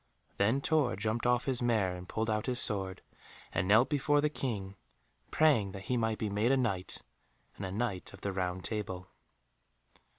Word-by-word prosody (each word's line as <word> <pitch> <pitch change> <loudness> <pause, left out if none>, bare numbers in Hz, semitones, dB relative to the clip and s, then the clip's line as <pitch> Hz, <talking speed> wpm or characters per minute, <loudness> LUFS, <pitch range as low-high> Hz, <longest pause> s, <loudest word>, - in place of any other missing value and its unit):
Then 110 +7 +2
Tor 145 -5 +2
jumped 110 +4 -1
off 125 0 +2
his 130 -3 0
mare 110 -7 +1
and 90 0 -9
pulled 110 0 -1
out 105 +1 -1
his 125 -1 0
sword, 95 -2 0 0.5
and 85 +2 0
knelt 110 +5 +6
before 145 0 +2
the 150 0 +1
King, 100 -9 -3 0.5
praying 120 -12 +3
that 95 -1 -7
he - - +3
might 110 -2 0
be 110 - -2
made 105 +4 +1
a 135 - +4
Knight 100 -8 -2 0.5
and 95 - -4
a - - -6
Knight 100 -3 -2
of - - -13
the 100 - -2
Round 90 -1 -2
Table. 95 -5 -4
110 Hz, 185 wpm, -32 LUFS, 95-125 Hz, 0.5 s, knelt